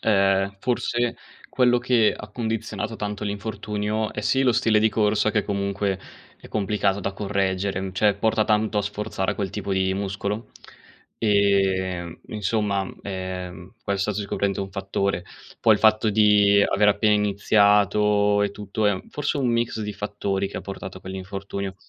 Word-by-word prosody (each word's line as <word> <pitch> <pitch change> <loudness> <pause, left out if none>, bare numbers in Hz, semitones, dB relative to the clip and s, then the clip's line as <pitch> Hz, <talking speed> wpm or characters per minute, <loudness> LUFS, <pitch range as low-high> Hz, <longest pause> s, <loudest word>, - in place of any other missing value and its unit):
ehm, 100 -1 +2
forse 120 0 0 0.3
quello 125 -1 +3
che 120 -3 +3
ha 105 - -9
condizionato 110 -1 -3
tanto 105 -1 -4
l'infortunio 105 +1 -3
è - - -4
sì 130 +6 +2
lo 125 -2 +4
stile 115 -2 +3
di 110 +1 +4
corsa 105 -1 +2
che 105 - +2
comunque 100 -1 -1 0.4
è - - -12
complicato 100 -1 0
da 100 +1 -3
correggere, 95 -1 -1
mhmm, 95 -1 -5
cioè 100 +2 +3
porta 110 +1 +1
tanto 105 0 +1
a - - +1
sforzare 105 -1 -2
quel 100 -3 -3
tipo 100 0 -4
di 95 0 +1
muscolo. 100 +2 -4 0.7
Ehm, 95 -4 +1
insomma, 105 -2 -1
ehm, 95 -1 -6
questo 100 +1 -1
è - - -3
sicuramente 100 -1 -1
un 95 0 -5
fattore. 95 -2 -2 0.4
Poi 110 - +5
il - - -1
fatto 110 0 +4
di 105 -1 +5
aver 105 +1 +3
appena 105 +1 +3
iniziato 105 0 +3
e 100 - 0
tutto 105 +1 -2
è 105 - +4
un 95 - -7
forse 145 0 -2
un 130 - +1
mix 115 -1 0
di 105 0 -4
fattori 100 -1 -2
che - - -8
ha - - -3
portato 95 -1 -7
a - - -21
quell'infortunio. 95 +1 -5
105 Hz, 160 wpm, -24 LUFS, 100-110 Hz, 0.7 s, Poi